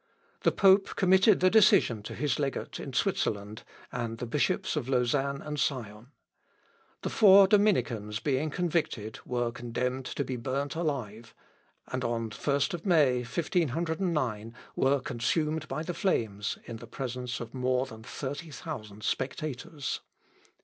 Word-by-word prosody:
The - - +3
pope 195 0 +4
committed 190 +1 +5
the 185 0 +5
decision 185 - +5
to 105 - -7
his 145 +2 -1
legate 140 -2 -3
in - - -6
Switzerland, 105 +1 -1 0.3
and 115 -1 -3
the 120 - -4
bishops 165 - 0
of 135 -4 -2
Lausanne 135 +2 +1
and 150 -1 -4
Sion. 115 -6 -2 1.0
The - - -2
four 200 -2 +8
Dominicans 140 - +2
being 145 +3 0
convicted, 155 -10 -2
were 120 -1 0
condemned 125 +2 -3
to 140 - -2
be 130 -2 -4
burnt 135 +4 -2
alive; 125 -9 -4 0.6
and 130 0 -2
on 115 -1 -1
the 105 - -10
1st 145 +5 0
May, 150 -9 +4
1509, 150 - -1 0.2
were 135 +1 +3
consumed 150 +6 -1
by 155 +3 -3
the 175 - -4
flames, 110 - -1
in 115 -1 -7
presence 125 -1 -5
of 120 - -7
more 130 0 +1
than 110 -4 -11
thirty 145 +7 -6
thousand 110 -9 -7
spectators. 145 +1 -3
135 Hz, 135 wpm, -29 LUFS, 120-160 Hz, 1.0 s, four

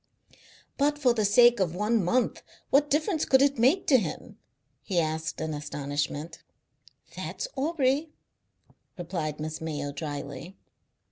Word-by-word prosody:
"But 290 +1 +2
for 260 -5 +3
the 215 -3 0
sake 240 +3 +6
of 175 -3 0
one 210 +2 +1
month! 245 +9 0 0.3
What 290 +1 +4
difference 310 +2 +1
could 265 - +4
it 280 -3 +1
make 270 +11 +3
to 260 -3 +5
him?" - - -6 0.4
he 185 -4 -1
asked 160 -1 -2
in 160 0 -3
astonishment. 145 +1 -4 0.7
"That's - - -5
Aubrey," 290 0 0 0.9
replied 165 -4 -4
Miss 155 +1 -5
Mayo 145 -3 -3
drily. 145 +3 -6
190 Hz, 130 wpm, -27 LUFS, -, 0.9 s, sake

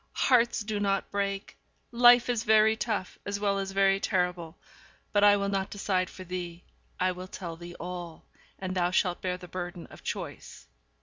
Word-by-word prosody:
hearts 240 -2 +3
do 210 -1 -3
not 195 -1 0
break; 200 -1 -2 0.4
life 240 0 +7
is 240 -3 0
very 220 -1 +5
tough 215 -5 -3
as 205 0 -3
well 200 -1 +1
as 195 0 -3
very 195 0 +3
terrible. 180 -4 -1 0.6
But 205 -1 +4
I 205 0 +7
will 200 0 -1
not 195 -1 -1
decide 190 -3 -1
for 185 - -10
thee. 175 -1 -6 0.4
I 185 0 +2
will 180 +1 -7
tell 170 -3 -7
thee 175 +1 -10
all; 175 -2 -7 0.3
and 185 -1 -4
thou 175 -1 +1
shalt 180 -1 +1
bear 180 -1 -2
the 180 0 -11
burden 175 0 -6
of - - -13
choice. - - -6
195 Hz, 180 wpm, -28 LUFS, 180-205 Hz, 0.6 s, life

